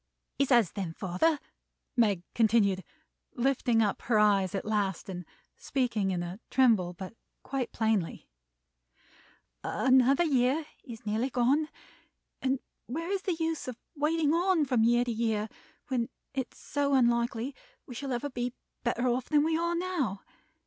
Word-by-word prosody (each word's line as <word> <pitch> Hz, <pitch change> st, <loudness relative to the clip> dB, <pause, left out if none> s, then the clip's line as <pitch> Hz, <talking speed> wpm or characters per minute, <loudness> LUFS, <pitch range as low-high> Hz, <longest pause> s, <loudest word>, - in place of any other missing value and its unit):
"He 280 Hz, -, +5 dB
says 235 Hz, -8 st, +4 dB
then, 185 Hz, -5 st, -4 dB
father," 190 Hz, -, +1 dB, 0.6 s
Meg 205 Hz, -7 st, +2 dB
continued, 210 Hz, -4 st, +3 dB, 0.5 s
lifting 245 Hz, -2 st, +2 dB
up 205 Hz, -, -1 dB
her 230 Hz, -3 st, +2 dB
eyes 200 Hz, -3 st, +3 dB
at 195 Hz, -, -3 dB
last, 205 Hz, -4 st, -1 dB
and 180 Hz, -2 st, -5 dB, 0.3 s
speaking 235 Hz, -7 st, 0 dB
in 180 Hz, -2 st, -1 dB
a 175 Hz, +3 st, -6 dB
tremble, 220 Hz, -9 st, +3 dB
but 185 Hz, +3 st, -8 dB, 0.3 s
quite 265 Hz, -3 st, -3 dB
plainly; 220 Hz, -6 st, -1 dB, 1.4 s
"another 260 Hz, +4 st, +4 dB
year 275 Hz, 0 st, +2 dB, 0.2 s
is 230 Hz, -5 st, -10 dB
nearly 220 Hz, +5 st, 0 dB
gone, 270 Hz, +5 st, +2 dB, 0.7 s
and 265 Hz, 0 st, +1 dB, 0.3 s
where 330 Hz, +8 st, -3 dB
is 395 Hz, -1 st, 0 dB
the 370 Hz, -3 st, -1 dB
use 325 Hz, -2 st, -2 dB
of 250 Hz, -3 st, -5 dB, 0.2 s
waiting 305 Hz, +1 st, +2 dB
on 345 Hz, -2 st, +3 dB
from 250 Hz, -4 st, +2 dB
year 240 Hz, +1 st, +4 dB
to 240 Hz, -, -1 dB
year, 220 Hz, -2 st, 0 dB, 0.4 s
when 250 Hz, -2 st, 0 dB, 0.2 s
it 265 Hz, -2 st, -1 dB
is -, -, -20 dB
so 280 Hz, -1 st, 0 dB
unlikely 235 Hz, +1 st, +2 dB, 0.3 s
we 250 Hz, -, -9 dB
shall 270 Hz, +3 st, -5 dB
ever 255 Hz, +4 st, -2 dB
be 245 Hz, 0 st, -3 dB, 0.3 s
better 240 Hz, +1 st, 0 dB
off 250 Hz, +1 st, 0 dB
than 295 Hz, -1 st, +4 dB
we 320 Hz, +1 st, +1 dB
are 340 Hz, +1 st, 0 dB
now? 335 Hz, -, -2 dB
245 Hz, 150 wpm, -30 LUFS, 215-280 Hz, 1.4 s, He